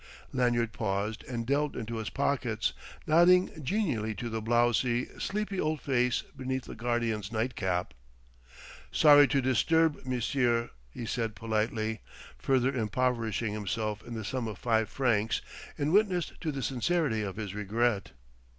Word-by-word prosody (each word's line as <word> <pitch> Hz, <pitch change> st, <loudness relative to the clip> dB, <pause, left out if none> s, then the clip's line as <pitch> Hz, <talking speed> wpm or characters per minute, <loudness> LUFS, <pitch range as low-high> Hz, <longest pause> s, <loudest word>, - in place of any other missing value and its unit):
Lanyard 120 Hz, -3 st, +1 dB
paused 105 Hz, 0 st, -2 dB
and 120 Hz, -2 st, -4 dB
delved 140 Hz, +3 st, 0 dB
into 115 Hz, -1 st, -4 dB
his 110 Hz, -2 st, -3 dB
pockets, -, -, 0 dB, 0.3 s
nodding 175 Hz, +3 st, +5 dB
genially 125 Hz, -, -1 dB
to 120 Hz, +1 st, -4 dB
the 110 Hz, 0 st, -3 dB
blowsy, 120 Hz, +1 st, +2 dB
sleepy 200 Hz, -1 st, -2 dB
old 155 Hz, 0 st, 0 dB
face 125 Hz, -3 st, +1 dB
beneath 130 Hz, -1 st, -3 dB
the -, -, -8 dB
guardian's 115 Hz, -3 st, -1 dB
nightcap. 95 Hz, -, -1 dB, 1.0 s
"Sorry 145 Hz, -2 st, +7 dB
to 135 Hz, -1 st, +1 dB
disturb 160 Hz, +5 st, +2 dB
monsieur," 125 Hz, -1 st, 0 dB, 0.2 s
he 115 Hz, -, -7 dB
said 115 Hz, -1 st, -2 dB
politely, 110 Hz, 0 st, -1 dB, 0.4 s
further 130 Hz, 0 st, +2 dB
impoverishing 115 Hz, -2 st, 0 dB
himself 105 Hz, 0 st, -2 dB
in 120 Hz, -, -7 dB
the 110 Hz, -2 st, -5 dB
sum 125 Hz, +2 st, -2 dB
of 105 Hz, -3 st, -5 dB
five 110 Hz, -2 st, +1 dB
francs 115 Hz, -5 st, +1 dB, 0.4 s
in 145 Hz, +1 st, 0 dB
witness 190 Hz, -4 st, +2 dB
to 160 Hz, -, -1 dB
the 135 Hz, -2 st, -4 dB
sincerity 135 Hz, 0 st, 0 dB
of 100 Hz, -3 st, -4 dB
his 105 Hz, -3 st, -5 dB
regret. 105 Hz, -, 0 dB
120 Hz, 140 wpm, -30 LUFS, 110-135 Hz, 1.0 s, Sorry